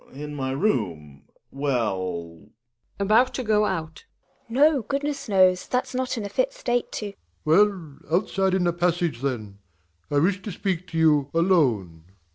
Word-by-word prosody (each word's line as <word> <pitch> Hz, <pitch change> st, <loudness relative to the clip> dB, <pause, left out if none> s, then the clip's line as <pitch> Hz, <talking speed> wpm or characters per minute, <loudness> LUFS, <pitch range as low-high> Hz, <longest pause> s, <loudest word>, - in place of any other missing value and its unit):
Gregers. 140 Hz, -, -12 dB
In 150 Hz, 0 st, -6 dB
my 135 Hz, -2 st, -3 dB
room 90 Hz, -, -2 dB
— -, -, -46 dB
well 95 Hz, -, -2 dB, 0.5 s
About 215 Hz, +6 st, +3 dB
to 255 Hz, -, -2 dB
go 210 Hz, -2 st, +2 dB
out. 160 Hz, -5 st, -4 dB, 0.4 s
GiNA. 240 Hz, +4 st, -3 dB
No, 295 Hz, -2 st, +5 dB
goodness 280 Hz, +1 st, -3 dB
knows, 185 Hz, -2 st, +4 dB
that's 250 Hz, +1 st, -1 dB
not 255 Hz, -1 st, -2 dB
in 215 Hz, -, -3 dB
a -, -, -2 dB
fit -, -, 0 dB
state 245 Hz, -, -1 dB
to 205 Hz, -2 st, -5 dB, 0.3 s
Weble. 170 Hz, -3 st, +2 dB
Well, 160 Hz, -, +2 dB
outside 190 Hz, -2 st, 0 dB
in 190 Hz, -, +1 dB
the 175 Hz, -1 st, +1 dB
passage, 175 Hz, -6 st, 0 dB
then; 110 Hz, -7 st, -4 dB, 0.5 s
I 145 Hz, -, 0 dB
wish 185 Hz, +6 st, +2 dB
to 205 Hz, -, -6 dB
speak 185 Hz, -1 st, -3 dB
to 165 Hz, -, -5 dB
you 150 Hz, -4 st, +3 dB
alone. 120 Hz, -, +1 dB
175 Hz, 170 wpm, -24 LUFS, 135-210 Hz, 0.5 s, No